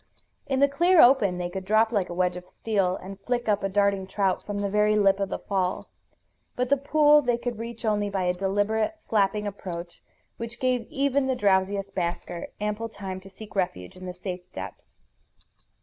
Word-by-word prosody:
In 270 -1 0
the 280 - +7
clear 345 +5 +3
open 240 -10 +6
they 180 0 -2
could 190 +2 -5
drop 215 +3 +3
like 200 -5 0
a - - -4
wedge 180 0 +1
of 180 0 -9
steel, 195 -3 0
and 195 +1 -8
flick 240 +4 -2
up 205 -2 +1
a 195 - 0
darting 200 -1 +1
trout 195 -1 0
from 205 -1 -4
the 200 0 -1
very 210 +1 +3
lip 200 -1 +4
of 195 -1 -1
the - - -2
fall. 185 -2 -2 0.7
But 250 0 -1
the 280 - +4
pool 295 +2 +5
they 245 -3 +1
could 240 -2 -4
reach 230 0 -6
only 205 -1 +1
by 195 -2 -1
a 180 0 +2
deliberate, 205 - 0
flapping 210 -1 +1
approach 175 -4 -6 0.4
which 230 +1 -6
gave 250 -3 0
even 280 0 +1
the 260 - +1
drowsiest 195 -2 +1
basker 175 -1 -3
ample 210 +2 -2
time 195 -3 -6
to 190 +1 -13
seek 210 +3 -12
refuge 135 - -2
in 185 0 -9
the 180 - -5
safe 180 0 -5
depths. 95 0 -9
205 Hz, 195 wpm, -26 LUFS, 190-230 Hz, 0.7 s, the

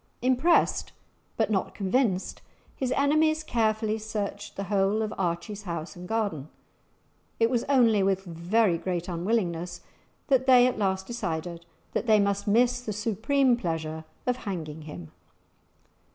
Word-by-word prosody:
Impressed 260 +7 +2 0.4
but - - +1
not 195 -3 -1
convinced, 195 -1 0 0.3
his 260 -2 -2
enemies 310 +3 +2
carefully 220 -4 0
searched 215 -2 -5
the 195 - -3
whole 200 +2 +1
of 215 - -3
Archie's 180 +3 -3
house 170 -2 -5
and 180 0 -9
garden; 200 -10 -2 0.9
it 230 +1 +3
was 240 -2 +1
only 235 -7 +4
with 190 0 +1
very 175 +2 +1
great 175 -1 -3
unwillingness 175 -1 -2 0.4
that 265 -2 +2
they 250 -2 +7
at 250 -3 0
last 190 -2 0
decided 170 -6 -4 0.3
that - - -2
they 215 -1 +6
must 200 0 0
miss 245 +4 +3
the 225 - -4
supreme 230 +5 +2
pleasure 160 -6 -3 0.2
of 250 0 +1
hanging 160 -9 -5
him! 90 - -9
205 Hz, 135 wpm, -27 LUFS, 175-240 Hz, 0.9 s, they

